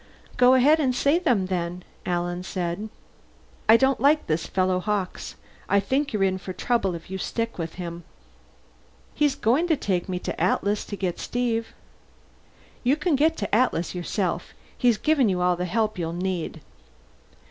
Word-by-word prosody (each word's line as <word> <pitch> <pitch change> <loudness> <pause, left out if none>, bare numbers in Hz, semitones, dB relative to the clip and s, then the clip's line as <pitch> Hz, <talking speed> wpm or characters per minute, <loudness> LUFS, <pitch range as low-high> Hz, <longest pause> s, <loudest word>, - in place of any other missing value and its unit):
"Go 250 +1 +6
ahead 290 +5 +5
and 260 -4 +1
say 285 +6 +3
them, 245 - +2
then," 180 -1 -3 0.2
Alan 175 0 -1
told 175 -2 -3
him. 215 +1 -6 0.8
"I 225 - +9
don't 265 +1 +2
like 290 +5 +3
this 160 +1 -1
fellow 185 -1 +1
Hawkes. 200 -1 -3 0.3
I 200 - +4
think 265 +8 0
you're 210 -4 0
in 190 -1 +1
for 185 0 -6
trouble 195 -2 0
if 170 +2 -10
you 190 - -4
stick 230 +1 -3
with 165 -1 -4
him." 170 -1 -6 1.1
"He's 295 -2 +2
going 260 +10 +2
to 320 -3 +2
take 190 -7 -1
me 180 - -1
to - - -4
the - - -6
Atlas 200 +3 +1
to 205 - -5
get 185 -3 -3
Steve." 235 -2 -2 1.1
"You 255 +3 +3
can 315 0 +1
get 315 +4 +2
to 205 - -2
the - - -8
Atlas 215 -7 +2
yourself. 180 0 -3 0.2
He's 240 -3 +3
given 285 -3 +2
you 185 -2 0
all 180 0 +2
the 180 +1 -3
help 215 +2 -1
you'll 165 -1 -2
need." 175 -3 -3
200 Hz, 180 wpm, -25 LUFS, 180-250 Hz, 1.1 s, I